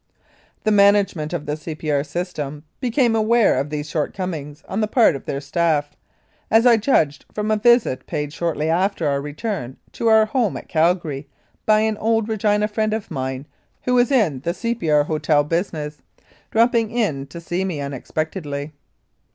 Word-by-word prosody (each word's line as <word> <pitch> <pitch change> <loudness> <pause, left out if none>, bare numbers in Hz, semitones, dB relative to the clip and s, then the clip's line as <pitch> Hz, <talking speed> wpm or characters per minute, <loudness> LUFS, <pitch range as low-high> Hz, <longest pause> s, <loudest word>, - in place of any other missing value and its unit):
The 215 - +2
management 200 -6 +3
of 175 -4 -3
the 150 - -2
C. 155 +1 -7
P. 155 0 -3
R. 140 -1 +2
system 150 -2 -5 0.2
became 245 -2 +2
aware 220 - +3
of 140 +2 -2
these 150 0 -4
shortcomings 155 -1 -4
on 200 +4 -2
the 215 - +1
part 220 - +4
of 135 - -8
their 140 - -2
staff, 145 -1 0 0.5
as 225 +2 +4
I 240 -2 +7
judged 160 - +1
from 215 0 -1
a - - +4
visit 235 - +3
paid 150 0 -3
shortly 155 -1 -1
after 175 0 +1
our 140 -1 0
return 145 - -4
to 230 - -2
our 220 -1 +6
home 220 -2 0
at - - -10
Calgary 160 -4 0 0.4
by 215 0 +5
an 220 -1 0
old 225 0 +1
Regina 210 -1 +1
friend 215 0 0
of 220 - -6
mine, 130 +1 -3 0.4
who 250 - 0
was 245 +1 +4
in 210 - +2
the 170 +6 -3
C.P.R. 180 -12 +1
hotel 150 -1 +1
business, 155 -2 -3 0.5
dropping 230 -1 +3
in 200 - -1
to 155 +5 -9
see 175 +2 -2
me 180 -6 -3
unexpectedly. 145 +2 -4
170 Hz, 170 wpm, -21 LUFS, 150-215 Hz, 0.5 s, I